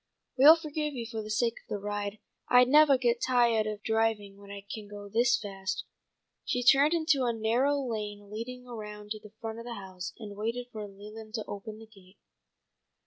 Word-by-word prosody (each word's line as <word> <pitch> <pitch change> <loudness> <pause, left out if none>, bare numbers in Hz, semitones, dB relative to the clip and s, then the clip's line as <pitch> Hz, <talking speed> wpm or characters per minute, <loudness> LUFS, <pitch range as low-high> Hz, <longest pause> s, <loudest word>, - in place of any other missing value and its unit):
"We'll 290 +5 +9
forgive 305 -2 -3
you 235 -2 -4
for 225 -1 -5
the 215 - -8
sake 230 +2 +1
of - - -36
the 210 - -2
ride. 205 0 -4 0.3
I 250 0 +7
nevah 285 +2 +6
get 240 -1 +1
tiahed 235 -4 +3
of 210 0 -8
driving 220 -3 0
when 200 0 -14
I 200 0 -8
can 215 -2 -7
go 205 0 -9
this 240 +4 +3
fast." 195 -2 -4 0.6
She 245 - -1
turned 280 +6 +6
into 315 -5 +2
a 240 - +2
narrow 235 +6 +2
lane 210 -5 -5
leading 250 +3 -6
around 210 -3 -8
to 215 - -3
the 210 -1 -14
front 225 0 -5
of 230 - -8
the 240 -1 -5
house, 190 -2 -7
and 205 -3 -8
waited 230 +4 -3
for 210 -1 -6
Leland 215 +3 -10
to 220 - -3
open 210 +2 -7
the 225 - -12
gate. 195 -3 -20
220 Hz, 195 wpm, -29 LUFS, 205-245 Hz, 0.6 s, We'll